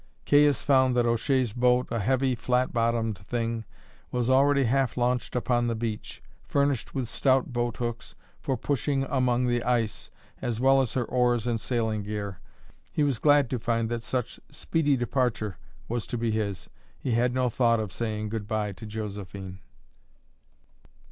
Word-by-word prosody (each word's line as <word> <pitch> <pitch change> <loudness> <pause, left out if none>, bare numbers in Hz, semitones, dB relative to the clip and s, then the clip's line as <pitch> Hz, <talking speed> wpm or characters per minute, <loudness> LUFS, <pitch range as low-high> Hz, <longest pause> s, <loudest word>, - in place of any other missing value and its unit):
Caius 145 -2 +4
found 130 -2 +4
that 120 -1 +3
O'Shea's 120 0 +1
boat, 125 +1 +3
a 115 - 0
heavy 130 +4 +1
flat 125 +1 0
bottomed 115 -3 0
thing, 115 +2 -3 0.4
was 125 0 0
already 140 +1 +4
half 130 0 +1
launched 125 0 0
upon 120 -1 +1
the 115 - 0
beach, 110 -1 -5 0.2
furnished 140 -3 0
with 130 -3 -1
stout 130 +1 +1
boat 120 -1 -1
hooks 120 -1 -4 0.2
for 135 - -2
pushing 140 +2 0
among 125 -2 +2
the 120 -1 +1
ice, 115 -4 -1 0.3
as 115 -2 -2
well 135 +1 +5
as 125 - -3
her 125 -2 +1
oars 120 -2 +1
and 120 -2 0
sailing 110 -3 -1
gear. 100 -2 -5 0.5
He 150 - +1
was 140 -6 +1
glad 145 -2 +5
to 125 - -1
find 115 -1 0
that 120 -1 -2
such 125 0 -3
speedy 145 -4 0
departure 120 - -1 0.3
was 120 -1 -3
to 120 - -3
be 115 -1 0
his. 100 -5 -2 0.3
He 130 - -3
had 120 +2 +2
no 125 -2 +1
thought 115 -1 +3
of 105 -4 -3
saying 110 -2 -3
good 110 -1 -4
bye 105 -2 -1
to 100 +3 -9
Josephine. 100 -3 -6
120 Hz, 165 wpm, -27 LUFS, 110-130 Hz, 0.5 s, well